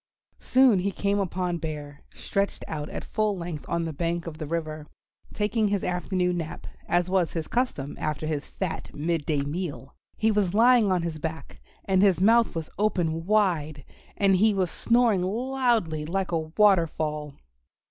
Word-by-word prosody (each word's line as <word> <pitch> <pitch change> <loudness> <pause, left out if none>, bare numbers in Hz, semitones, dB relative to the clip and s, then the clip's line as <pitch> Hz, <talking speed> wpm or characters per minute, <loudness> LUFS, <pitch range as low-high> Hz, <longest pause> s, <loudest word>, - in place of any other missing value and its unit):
Soon 255 -6 +4
he 195 +2 0
came 200 +1 0
upon 180 -2 -1
Bear, 150 -2 -6
stretched 200 0 -2
out 150 -1 -4
at - - -6
full 215 -2 0
length 170 -4 -6
on 170 0 0
the 160 - -4
bank 170 +2 -2
of 160 -2 -7
the 155 - -4
river, 155 -1 -4 0.4
taking 215 +1 0
his 200 -1 0
afternoon 180 0 0
nap, 160 -2 -5 0.2
as 175 0 +2
was 185 -2 +1
his 160 -2 -3
custom 235 - -2
after 155 0 -2
his 155 -2 -3
fat 190 -4 -4
midday 155 -2 -1
meal. 145 -2 -5 0.2
He 220 0 +2
was 200 -3 +1
lying 230 -2 +5
on 180 -2 +1
his 165 -2 -4
back, 160 +1 -6 0.2
and 190 -1 +3
his 195 -4 +4
mouth 230 +3 +4
was 160 -1 -4
open 170 -5 0
wide, 165 -9 +1 0.3
and 195 -2 +4
he 210 +2 +3
was 185 -3 0
snoring 235 -5 +2
loudly 230 -5 0
like 185 +3 -2
a 165 - +1 0.2
waterfall. 155 -7 +2
180 Hz, 165 wpm, -26 LUFS, 160-205 Hz, 0.4 s, lying